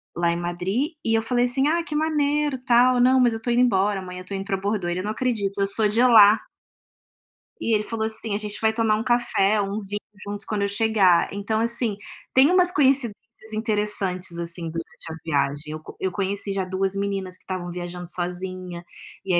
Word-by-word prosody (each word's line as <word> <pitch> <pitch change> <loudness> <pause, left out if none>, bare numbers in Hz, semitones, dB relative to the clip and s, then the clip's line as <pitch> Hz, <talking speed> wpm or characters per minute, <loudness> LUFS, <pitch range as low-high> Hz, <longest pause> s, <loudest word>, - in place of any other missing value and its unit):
lá 170 0 +1
em 170 - -2
Madrid. 185 - -2
E 225 - +1
eu 225 - +1
falei 245 +1 +1
assim: 265 +3 +2
“Ah, 335 +2 +1
que 300 -2 -6
maneiro”, 300 -2 +1
tal. 245 0 +4
“Não, 260 +1 +5
mas 245 -2 +4
eu 225 - -2
estou 230 +2 -3
indo 240 +1 +3
embora 200 -3 +2
amanhã, 180 -1 -8
eu - - -7
estou 195 +1 -5
indo 195 - -5
pra 195 - -1
Bordeaux”. 195 -2 -2
Ele: 180 +1 -2
“Não 210 +3 -3
acredito, 215 -5 -2
eu 195 - +2
sou 210 +2 +2
de 220 +3 +1
lá”. 220 -3 +7 1.2
E 230 - 0
ele 210 - 0
falou 220 0 -3
assim: 220 -1 -3
“A - - +1
gente 210 -1 -4
vai 220 0 +3
tomar 220 -1 +2
um 220 - -3
café, 235 -4 +2
um 200 +1 -3
vinho 205 0 -5 0.3
juntos 205 0 -5
quando 210 -2 -2
eu - - +1
chegar”. 200 -4 +3
Então 205 +2 -2
assim, 230 -2 0 0.4
tem 270 +5 +6
umas 360 -1 +4
coincidências 235 - 0
interessantes, 205 -5 -1
assim, 170 0 -2
durante 165 0 -8
a 160 - -6
viagem. 145 0 -1
Eu 155 - -6
co - - -12
eu 190 - -1
já 175 - -15
conheci 200 0 -2 0.2
2 190 +1 -1
meninas 195 -2 -3
que - - -12
estavam 180 -2 -5
viajando 175 0 -6
sozinha 180 0 -4 0.4
e 190 - 0
aí 175 - +5
205 Hz, 215 wpm, -23 LUFS, 185-235 Hz, 1.2 s, lá